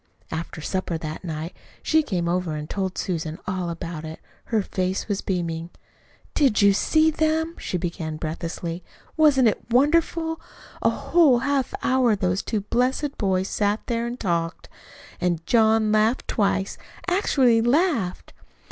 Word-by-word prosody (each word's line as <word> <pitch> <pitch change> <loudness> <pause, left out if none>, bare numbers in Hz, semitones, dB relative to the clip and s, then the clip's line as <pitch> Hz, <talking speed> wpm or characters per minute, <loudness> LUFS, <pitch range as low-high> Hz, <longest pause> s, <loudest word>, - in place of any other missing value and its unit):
After 160 0 -5
supper 185 0 -2
that 155 +1 -6
night 160 0 -5 0.3
she 315 0 +4
came 185 - -2
over 175 -2 -1
and 150 0 -5
told 190 0 -3
Susan 165 -3 -3
all 185 -2 -2
about 165 -1 -5
it. 160 0 -7 0.3
Her 220 -3 0
face 185 0 -2
was 205 -2 -1
beaming. 170 -3 -2 0.6
"Did 270 -8 +3
you 200 -1 +6
see 315 +10 +3
them?" 315 +1 0
she 180 - -2
began 165 -3 -4
breathlessly. 165 +2 -4 0.3
"Wasn't 290 -6 +5
it 215 - 0
wonderful? 325 +5 +2 0.4
A - - +4
whole 315 -8 +4
half 275 +1 0
hour 255 -4 +3
those 185 -1 0
two 215 -3 -2
blessed 255 +7 0
boys 190 -2 +1
sat 205 +1 0
there 235 -1 -1
an' 240 +1 -5
talked; 170 -5 -2 0.5
an' 175 -1 +1
John 220 -1 +3
laughed 215 +4 +2
twice, 200 -2 0 0.3
actually 270 - +3
laughed." 240 - +1
200 Hz, 145 wpm, -24 LUFS, 170-260 Hz, 0.6 s, you